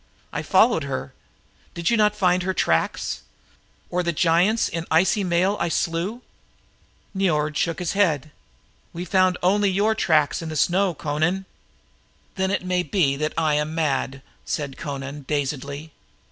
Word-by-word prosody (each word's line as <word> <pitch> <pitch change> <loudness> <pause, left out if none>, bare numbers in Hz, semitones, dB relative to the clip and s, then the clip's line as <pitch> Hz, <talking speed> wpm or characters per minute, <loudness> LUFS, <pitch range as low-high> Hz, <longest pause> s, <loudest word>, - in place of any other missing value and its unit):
I - - -2
followed 215 -10 +3
her. 130 - -4 0.6
Did 170 +3 0
you - - +4
not 210 -1 +3
find 185 -3 +2
her 185 +1 -2
tracks. 80 0 0 0.7
Or 180 - +1
the 170 -1 0
giants 175 +7 +3
in 165 0 -4
icy 190 +6 +3
mail 185 +3 +1
I 170 - 0
slew?" 175 +9 -2 0.9
Niord 155 -6 +1
shook 165 +2 0
his 180 - -2
head. 155 -7 +1 0.6
"We 175 +2 -5
found 185 0 +3
only 200 +2 +3
your 205 +4 +2
tracks 155 -9 +2
in 165 - -5
the 155 - -5
snow, 180 +2 +2
Amra." 160 +6 0 0.9
"Then 190 0 -1
it 190 -2 -1
may 180 0 +1
be 175 -7 +1 0.2
I 155 -2 +2
was 150 - -2
mad," 140 -4 -1 0.2
said 140 -3 -3
Amra 140 -2 -4
dazedly. 145 +1 -3
170 Hz, 145 wpm, -23 LUFS, 150-190 Hz, 0.9 s, you